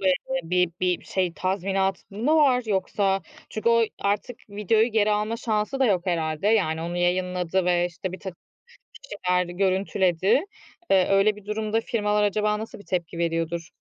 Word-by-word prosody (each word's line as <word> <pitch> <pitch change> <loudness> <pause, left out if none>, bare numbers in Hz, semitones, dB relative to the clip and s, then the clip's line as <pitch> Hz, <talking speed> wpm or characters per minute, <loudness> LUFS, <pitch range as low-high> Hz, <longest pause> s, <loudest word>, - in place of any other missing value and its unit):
bö - - -6 0.4
bı 165 - -13 0.3
bi 180 -1 +1
bir - - -19
şey, 185 -3 -1
tazminat 190 +1 -1
mı 230 +10 +1
var 265 -5 +4
yoksa 195 -1 0 0.3
çünkü 215 +1 -1
o 230 0 +5 0.2
artık 205 +4 -1
videoyu 210 +2 +2
geri 215 -1 +3
alma 210 +2 0
şansı 220 +4 -2
da 265 - +5
yok 190 -4 +1
herhâlde. 160 -1 -1
Yani, 180 -8 +2
onu 170 +1 -4
yayınladı 180 0 0
ve, 175 -1 +2
işte, 180 +1 -6
birtakım 185 -1 -8 0.7
kişiler 180 -7 -1
görüntüledi. 190 - +1 0.5
Eee, 190 -1 +5
öyle 195 +2 +4
bir 210 -1 -14
durumda 215 +1 -1
firmalar 210 -2 0
acaba 210 +1 +1
nasıl 220 -1 -8
bir 200 - -14
tepki 170 -3 -3
veriyordur? 165 0 -2
195 Hz, 160 wpm, -25 LUFS, 180-210 Hz, 0.7 s, o